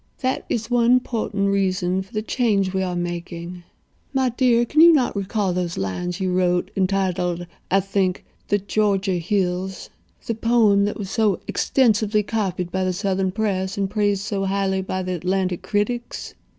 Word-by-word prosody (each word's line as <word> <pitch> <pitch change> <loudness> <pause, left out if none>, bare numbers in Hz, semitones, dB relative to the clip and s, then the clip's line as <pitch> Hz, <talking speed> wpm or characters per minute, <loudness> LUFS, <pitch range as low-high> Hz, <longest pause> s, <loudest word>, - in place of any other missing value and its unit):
That 260 0 -1
is 225 +1 -2
one 245 +1 +5
portent 210 -5 -2
reason 185 -1 +1
for 190 - -12
the 215 -2 -2
change 205 -6 +1
we 190 - 0
are 180 -1 -2
making. 175 0 -5 0.5
My 260 -1 +3
dear, 240 -1 +3
can 305 +6 +3
you 340 +1 +9
not 270 -9 +2
recall 200 -1 -1
those 175 -1 -2
lines 175 - -3
you 185 -1 0
wrote—entitled, 180 0 0 0.2
I 195 - +4
think, 190 -1 -1 0.2
'The 205 - +2
Georgia 200 -2 0
Hills'—the 185 +4 -3
poem 220 -4 +4
that 205 - -2
was 195 -2 -6
so 215 -6 +2
extensively 215 -4 +2
copied 190 -5 -2
by 190 0 -1
the 185 0 0
Southern 190 0 0
press 195 -2 -1
and 195 -1 0
praised 205 -2 +1
so 200 -2 -2
highly 195 0 0
by 185 0 -3
the 185 0 -3
Atlanta 185 +1 0
critics?" 210 +6 -3
195 Hz, 160 wpm, -22 LUFS, 185-215 Hz, 0.5 s, you